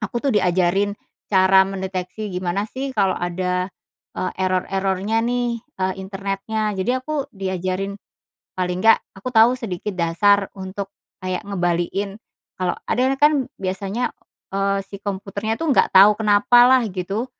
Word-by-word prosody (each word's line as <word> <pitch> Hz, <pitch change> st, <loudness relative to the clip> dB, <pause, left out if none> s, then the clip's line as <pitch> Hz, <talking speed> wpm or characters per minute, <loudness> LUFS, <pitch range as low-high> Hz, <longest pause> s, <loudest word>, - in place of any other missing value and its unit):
aku 240 Hz, +3 st, -3 dB
tuh 275 Hz, -, +2 dB
diajarin 190 Hz, +2 st, +2 dB, 0.3 s
cara 190 Hz, 0 st, +6 dB
mendeteksi, 190 Hz, +1 st, -4 dB
gimana 180 Hz, +3 st, -2 dB
sih 270 Hz, +1 st, -4 dB
kalau 195 Hz, -3 st, +2 dB
ada, 180 Hz, +1 st, -1 dB, 0.5 s
eee, 185 Hz, -, -2 dB
error-errornya 190 Hz, +3 st, 0 dB
nih, 240 Hz, -1 st, -1 dB
eee, 190 Hz, -4 st, -3 dB
internetnya. 200 Hz, +2 st, -3 dB
Jadi 190 Hz, +6 st, 0 dB
aku 285 Hz, +1 st, -3 dB
diajarin, 190 Hz, 0 st, -3 dB, 0.6 s
paling 180 Hz, 0 st, -1 dB
nggak 225 Hz, 0 st, +7 dB, 0.2 s
aku 195 Hz, +6 st, -5 dB
tahu 230 Hz, +2 st, +6 dB
sedikit 210 Hz, -4 st, -4 dB
dasar 195 Hz, +4 st, +3 dB
untuk 195 Hz, +1 st, -6 dB, 0.3 s
kayak 185 Hz, +1 st, -2 dB
ngembaliin, 190 Hz, +1 st, -1 dB, 0.4 s
kalau 180 Hz, -1 st, 0 dB
ada 245 Hz, -, +1 dB
nah 270 Hz, -, -1 dB
kan 295 Hz, -3 st, +4 dB
biasanya, 195 Hz, +5 st, -2 dB, 0.4 s
eee, 195 Hz, 0 st, +1 dB
si 200 Hz, 0 st, -10 dB
komputernya 200 Hz, +2 st, -3 dB
tuh 325 Hz, -2 st, +1 dB
nggak -, -, +4 dB
tahu 200 Hz, +2 st, +9 dB
kenapa 220 Hz, +3 st, +5 dB
lah 260 Hz, -1 st, +5 dB
gitu, 195 Hz, +6 st, -3 dB
195 Hz, 140 wpm, -21 LUFS, 185-220 Hz, 0.6 s, tahu